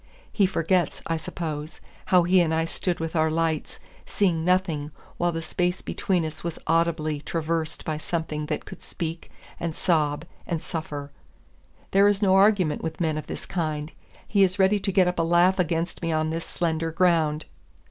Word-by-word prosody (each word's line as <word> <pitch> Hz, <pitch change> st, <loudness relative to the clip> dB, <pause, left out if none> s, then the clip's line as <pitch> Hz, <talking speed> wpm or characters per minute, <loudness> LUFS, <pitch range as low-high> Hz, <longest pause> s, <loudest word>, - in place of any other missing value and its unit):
He 200 Hz, -3 st, +3 dB
forgets, 175 Hz, -1 st, 0 dB
I 165 Hz, -, 0 dB
suppose, 155 Hz, -1 st, -5 dB, 0.3 s
how 180 Hz, -2 st, +5 dB
he 180 Hz, +1 st, +5 dB
and 160 Hz, -2 st, +1 dB
I 160 Hz, 0 st, +1 dB
stood 175 Hz, +1 st, -2 dB
with 165 Hz, +1 st, -4 dB
our 160 Hz, 0 st, +3 dB
lights, 160 Hz, -1 st, -1 dB, 0.3 s
seeing 175 Hz, -6 st, +1 dB
nothing, 175 Hz, -5 st, +1 dB, 0.3 s
while 175 Hz, 0 st, +1 dB
the 165 Hz, -1 st, -4 dB
space 180 Hz, +3 st, -1 dB
between 180 Hz, -4 st, 0 dB
us 155 Hz, -, -6 dB
was 170 Hz, -1 st, -3 dB
audibly 160 Hz, -2 st, +1 dB
traversed 165 Hz, 0 st, -2 dB
by 155 Hz, -1 st, -2 dB
something 155 Hz, -2 st, -3 dB
that -, -, -3 dB
could 190 Hz, -, -10 dB
speak, 165 Hz, 0 st, -5 dB, 0.3 s
and 165 Hz, -2 st, -3 dB
sob, 155 Hz, -3 st, +1 dB, 0.2 s
and 170 Hz, -2 st, -1 dB
suffer. 150 Hz, -4 st, -5 dB, 0.8 s
There 200 Hz, +1 st, +6 dB
is 205 Hz, -1 st, +3 dB
no 195 Hz, -3 st, +3 dB
argument 195 Hz, -5 st, +4 dB
with 160 Hz, -1 st, -4 dB
men 160 Hz, -3 st, +1 dB
of 155 Hz, -, -5 dB
this -, -, -6 dB
kind. 155 Hz, -3 st, -2 dB, 0.4 s
He 200 Hz, -, +2 dB
is 185 Hz, 0 st, +2 dB
ready 195 Hz, +1 st, +4 dB
to 195 Hz, -, -1 dB
get 185 Hz, -1 st, +4 dB
up 180 Hz, -1 st, -1 dB
a -, -, +4 dB
laugh 175 Hz, +3 st, +4 dB
against 170 Hz, 0 st, -1 dB
me 165 Hz, -1 st, -1 dB
on 155 Hz, 0 st, 0 dB
this 165 Hz, 0 st, -3 dB
slender 165 Hz, -1 st, -1 dB
ground. 160 Hz, -3 st, +2 dB
165 Hz, 180 wpm, -25 LUFS, 155-180 Hz, 0.8 s, There